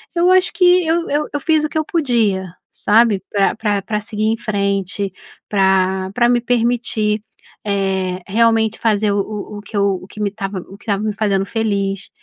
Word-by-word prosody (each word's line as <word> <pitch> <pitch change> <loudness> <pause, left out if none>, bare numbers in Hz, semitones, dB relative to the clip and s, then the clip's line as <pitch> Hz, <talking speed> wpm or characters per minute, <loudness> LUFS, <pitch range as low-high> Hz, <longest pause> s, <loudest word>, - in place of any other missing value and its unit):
eu 350 +2 +4
acho 370 0 +4
que 365 - +2 0.2
eu 335 +1 +1
eu 295 +1 0
eu 290 - -2
fiz 310 0 +2
o 305 - -1
que 315 - -4
eu 310 - 0
podia, 225 - 0 0.2
sabe, 210 -2 +3
pra 200 0 +1
pra 205 -2 -1
pra 210 -1 -2
seguir 215 0 -3
em 225 +1 +1
frente, 200 -2 -1 0.4
pra 190 -1 +2
pra 240 -1 +4
me 240 -1 +3
permitir, 230 -3 +1 0.5
eh, 190 -2 -1
realmente 225 +1 +2
fazer 215 -2 +1
o - - 0
o 210 0 -6
o - - -10
que 205 0 -7
eu 200 -2 +1
o - - -12
que 215 - -12
me 205 - +1
estava 195 -2 -5
o 195 - -12
que - - -18
estava 205 -1 -1
me 215 -1 -1
fazendo 195 -2 0
feliz. 200 -3 -2
210 Hz, 195 wpm, -18 LUFS, 195-235 Hz, 0.5 s, eu